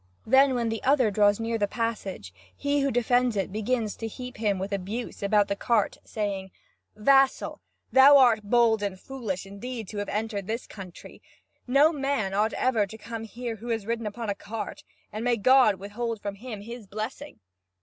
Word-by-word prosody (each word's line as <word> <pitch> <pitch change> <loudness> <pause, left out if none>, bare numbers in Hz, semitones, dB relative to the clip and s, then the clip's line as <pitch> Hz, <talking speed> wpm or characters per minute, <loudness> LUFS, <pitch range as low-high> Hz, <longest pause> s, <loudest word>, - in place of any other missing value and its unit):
Then, 265 +2 +5
when 235 -2 0
the 225 0 -3
other 260 -5 +3
draws 205 0 +3
near 230 0 -2
the 205 - +2
passage, 200 - -4 0.2
he 285 0 0
who 275 0 +1
defends 245 0 +2
it 195 -1 -1
begins 220 +1 -1
to 225 - -4
heap 250 +3 -8
him 210 -3 0
with 190 +2 -4
abuse 200 +5 -4
about 205 0 +3
the 200 - -1
cart, 220 0 0
saying: 200 -3 -3 0.5
"Vassal, 270 +5 +3 0.3
thou 275 +2 +8
art 245 -5 +5
bold 225 0 +3
and 195 -2 -3
foolish, 220 -9 -5
indeed, 220 +3 -7
to 210 - -7
have 205 - -3
entered 210 -2 -3
this 230 +3 -3
country. 185 -4 -11 0.5
No 285 +6 +5
man 275 -9 -1
ought 210 +3 +1
ever 230 -5 +1
to 220 - -10
come 225 +1 -7
here 235 0 -6
who 230 +4 -10
had 225 -3 -1
ridden 230 0 -2
upon 225 +2 -5
a 200 - 0
cart, 210 +1 -7 0.3
and 215 +2 -5
may 245 -1 +2
God 255 -1 +5
withhold 215 +4 -4
from 200 -1 -4
him 215 0 -8
His 230 0 -9
blessing!" 215 +8 -6
225 Hz, 185 wpm, -27 LUFS, 205-245 Hz, 0.5 s, thou